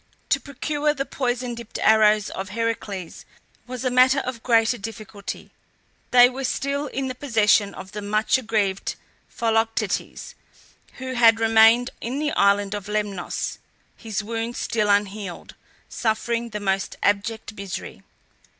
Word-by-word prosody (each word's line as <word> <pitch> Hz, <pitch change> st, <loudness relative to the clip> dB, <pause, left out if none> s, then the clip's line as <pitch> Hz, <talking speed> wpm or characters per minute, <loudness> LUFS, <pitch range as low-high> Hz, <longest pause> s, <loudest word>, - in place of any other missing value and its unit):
To -, -, +3 dB
procure 295 Hz, +1 st, -2 dB
the 275 Hz, -, -2 dB
poison 250 Hz, -3 st, -2 dB
dipped 235 Hz, -1 st, -8 dB
arrows 215 Hz, -1 st, +4 dB
of 190 Hz, +1 st, -5 dB
Heracles 205 Hz, -4 st, -4 dB, 0.4 s
was 255 Hz, +1 st, -6 dB
a 255 Hz, -, +1 dB
matter 255 Hz, +2 st, +5 dB
of 250 Hz, -3 st, -5 dB
greater 230 Hz, 0 st, +3 dB
difficulty. 215 Hz, -1 st, -7 dB, 0.6 s
They 245 Hz, 0 st, +8 dB
were 260 Hz, +2 st, -5 dB
still 280 Hz, +3 st, -1 dB
in 270 Hz, -1 st, -3 dB
the 255 Hz, -, -3 dB
possession 220 Hz, -6 st, +2 dB
of 190 Hz, -, -9 dB
the 210 Hz, -, -6 dB
much 215 Hz, +5 st, +1 dB
aggrieved 210 Hz, -5 st, -1 dB, 0.3 s
Philoctetes, 225 Hz, -1 st, -1 dB, 0.6 s
who 260 Hz, 0 st, -6 dB
had 230 Hz, -2 st, +5 dB
remained 225 Hz, +2 st, +5 dB
in 245 Hz, +4 st, -3 dB
the 295 Hz, 0 st, -1 dB
island 200 Hz, -2 st, +2 dB
of 205 Hz, -1 st, -5 dB
Lemnos, 210 Hz, -3 st, -3 dB, 0.4 s
his 215 Hz, -2 st, -4 dB
wound 230 Hz, +2 st, -3 dB
still 215 Hz, -2 st, 0 dB
unhealed, 200 Hz, -2 st, -1 dB, 0.3 s
suffering 235 Hz, +1 st, -1 dB
the 210 Hz, -1 st, -5 dB
most 195 Hz, -1 st, -1 dB
abject 210 Hz, +2 st, 0 dB
misery. 200 Hz, -3 st, -7 dB
225 Hz, 135 wpm, -23 LUFS, 205-245 Hz, 0.6 s, They